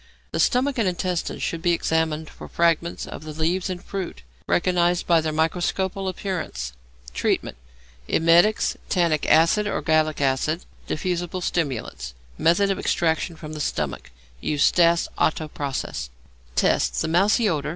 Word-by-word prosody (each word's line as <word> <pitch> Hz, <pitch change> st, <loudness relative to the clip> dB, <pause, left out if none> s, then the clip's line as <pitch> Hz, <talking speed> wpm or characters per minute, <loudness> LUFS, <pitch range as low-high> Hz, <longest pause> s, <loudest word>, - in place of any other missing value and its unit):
The -, -, -2 dB
stomach 255 Hz, +1 st, +2 dB
and 215 Hz, -, +2 dB
intestines 180 Hz, -1 st, -2 dB
should 165 Hz, -, -2 dB
be 175 Hz, 0 st, +2 dB
examined 160 Hz, -2 st, 0 dB
for -, -, -11 dB
fragments 170 Hz, 0 st, +1 dB
of -, -, -8 dB
the 155 Hz, -1 st, -7 dB
leaves 170 Hz, +5 st, 0 dB
and 180 Hz, -1 st, -5 dB
fruit, 185 Hz, -, -5 dB, 0.2 s
recognized 175 Hz, -1 st, +2 dB
by 170 Hz, -2 st, +4 dB
their 155 Hz, 0 st, -2 dB
microscopical 180 Hz, +4 st, -1 dB
appearances. 175 Hz, -, -4 dB, 0.4 s
Treatment. -, -, -1 dB, 0.5 s
Emetics, 170 Hz, +6 st, +4 dB
tannic 170 Hz, -5 st, +1 dB
acid 165 Hz, +7 st, +4 dB
or -, -, -1 dB
gallic 155 Hz, -1 st, +2 dB
acid. 140 Hz, +5 st, 0 dB, 0.2 s
Diffusible 175 Hz, +2 st, -2 dB
stimulants. 125 Hz, -, -3 dB, 0.2 s
Method 195 Hz, +4 st, +3 dB
of 195 Hz, -, -2 dB
Extraction 165 Hz, 0 st, 0 dB
from 155 Hz, -1 st, -9 dB
the 155 Hz, -, -6 dB
Stomach. 65 Hz, -, -3 dB, 0.3 s
Use 145 Hz, -, 0 dB
Stas 170 Hz, -1 st, +4 dB
Otto 155 Hz, 0 st, +1 dB
process. 135 Hz, -, -4 dB, 0.5 s
Tests. -, -, +2 dB
The -, -, 0 dB
mousy 200 Hz, +7 st, +3 dB
odour. 150 Hz, -5 st, -1 dB
165 Hz, 140 wpm, -24 LUFS, 155-180 Hz, 0.5 s, by